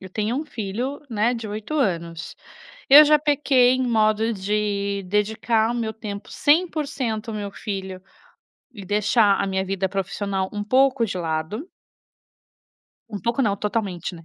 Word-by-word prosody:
eu 190 - -10
tenho 215 +5 -2
um 300 - -2
filho 240 +5 -4
só, 295 - -25
né, 225 +4 +2
de 230 -3 -6
8 215 +8 -5
anos. 170 - -2 0.5
Eu 290 +3 +10
já 300 0 +5
pequei 285 -4 +3
em 260 - -1
modo 220 0 +2
de 200 0 -2
dedicar 220 +3 +1
o - - -4
meu 230 -2 -2
tempo 210 -2 -8
100% 285 -8 0
ao - - -5
meu 205 -1 -4
filho, 190 -2 -6 0.7
e 200 -4 -9
deixar 210 +1 +3
a - - -1
minha 190 0 -1
vida 190 0 -2
profissional 195 0 -2
um 205 -1 -3
pouco 260 +2 +3
de 185 -4 -4
lado 165 - -3 1.4
um 205 - -5
pouco 235 +7 0
não, 205 -4 +1
totalmente, 200 -4 -3
né. 165 -1 -13
210 Hz, 160 wpm, -23 LUFS, 195-240 Hz, 1.4 s, Eu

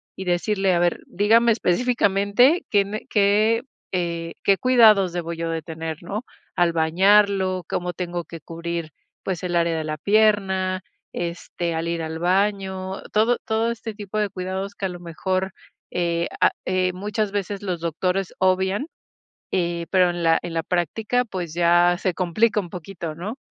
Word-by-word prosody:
y 190 - -6
decirle: 190 +2 +1
"A 170 - +2
ver, 175 0 +1
dígame 225 +4 +4
específicamente 225 - +2
qué 200 -2 +4
ne 210 +2 -6
qué, 215 +3 +3 0.3
eh, 170 -2 -2
qué 195 -1 +4
cuidados 215 -8 +5
debo 170 -1 -3
yo 165 0 -3
de 165 -1 -2
tener, 160 0 -5
¿no?, 210 +7 -4 0.3
al 175 -1 +2
bañarlo, 190 +3 +3
cómo 180 0 -2
tengo 175 0 -4
que 165 - -9
cubrir, 170 0 -5 0.3
pues, 185 -2 -3
el 175 -1 -2
área 170 -1 +1
de 160 - -2
la 155 0 -3
pierna, 195 -2 +2 0.3
este, 170 0 -3
al 165 +1 -2
ir 170 -1 -2
al 160 0 -5
baño". 190 +1 0
Todo 225 +3 +3
todo 225 +1 +1
este 230 -1 -6
tipo 210 0 -4
de 210 - +1
cuidados 190 +1 -4
que 195 - -4
a - - -6
lo 175 -1 -8
mejor, 185 +3 -2 0.4
eh, 170 -1 0
ah, - - +6
eh, 185 0 +1
muchas 205 +2 -2
veces 200 0 -3
los 180 -4 -2
doctores 180 +3 -1
obvian, 190 +6 +2 0.7
eh, 170 -2 -1
pero 180 -2 +4
en 175 0 -5
la 165 0 +4
en 175 - -5
la 165 - +1
práctica, 210 +8 0
pues, 180 -7 -5
ya 175 +1 +4
se 185 -3 0
complica 210 +5 +2
un 175 - -10
poquito, 170 -2 -6
¿no? 200 +9 -5
185 Hz, 170 wpm, -23 LUFS, 170-205 Hz, 0.7 s, ah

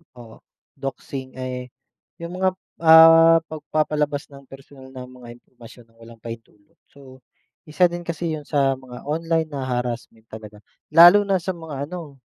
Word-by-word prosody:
Oo. 115 -2 -14 0.4
Doxing, 135 -1 -7
eh, 130 -1 -6 0.5
yung 170 +1 -7
mga, 190 - +2 0.3
ah, 165 0 +8
pagpapalabas 150 -1 -3
ng 140 -1 -15
personal 135 0 -15
na 130 -1 -9
mga 125 -2 -13
impormasyon 120 -1 -17
ng 115 - -31
walang 115 0 -15
pahintulot. 115 -3 -12
So, 130 -2 -17 0.5
isa 175 +4 +2
din 175 0 -6
kasi 170 0 -3
yun 150 -2 -11
sa 135 -3 +1
mga 125 -2 -12
online 165 0 -1
na 140 -3 -5
harassment 120 -2 -5
talaga 105 -1 -12 0.3
lalo 175 +5 +8
na 195 -2 0
sa 190 - -6
mga 155 -5 -6
ano, 155 -7 -10
140 Hz, 150 wpm, -21 LUFS, 125-165 Hz, 0.5 s, ah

